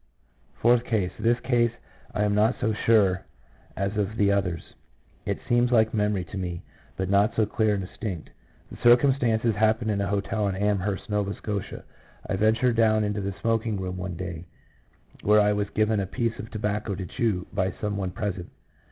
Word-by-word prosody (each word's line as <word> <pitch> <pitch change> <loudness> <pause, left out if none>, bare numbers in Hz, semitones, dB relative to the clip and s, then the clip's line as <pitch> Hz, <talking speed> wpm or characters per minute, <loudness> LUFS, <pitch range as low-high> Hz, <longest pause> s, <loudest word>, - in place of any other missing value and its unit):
Fourth 120 0 +3
case. 105 -7 0
This 120 +1 +2
case 120 -2 +2 0.4
I 105 - 0
am 105 0 +1
not 110 +4 +3
so 110 -3 +1
sure 100 -4 +3 0.5
of 100 +2 -2
as 105 +2 -2
the 100 -2 +3
others; 95 -4 -2 0.5
it - - 0
seems 120 +1 +3
like 110 -2 +4
memory 105 -3 +1
to 100 - -4
me, 90 -2 -4 0.3
but 95 - -1
not 100 +4 +3
so 110 - +3
clear 105 0 +1
and 95 -2 -3
distinct. 95 -7 -6 0.4
The - - -9
circumstances 120 -2 +4
happened 110 +1 +2
in 100 -1 0
a 100 - 0
hotel 100 +1 -1
in 95 - -1
Amherst, 100 0 -1
Nova 105 -1 -1
Scotia. 100 -2 -5 0.4
I - - -1
ventured 110 +4 +2
down 110 -1 +4
into 105 0 -1
the 100 0 -3
smoking 115 -2 0
room 90 -1 -4
one 90 -1 -4
day, 90 -1 -6 0.8
where 105 +1 +5
I 105 0 +4
was 105 -1 -1
given 110 0 +1
a 95 - -2
piece 115 +2 -2
of 110 - -7
tobacco 105 -1 -2
to 95 0 -5
chew 95 -1 -1
by 95 -1 0
some 105 -1 -2
one 95 -2 -2
present. 95 -1 -4
105 Hz, 185 wpm, -26 LUFS, 95-110 Hz, 0.8 s, where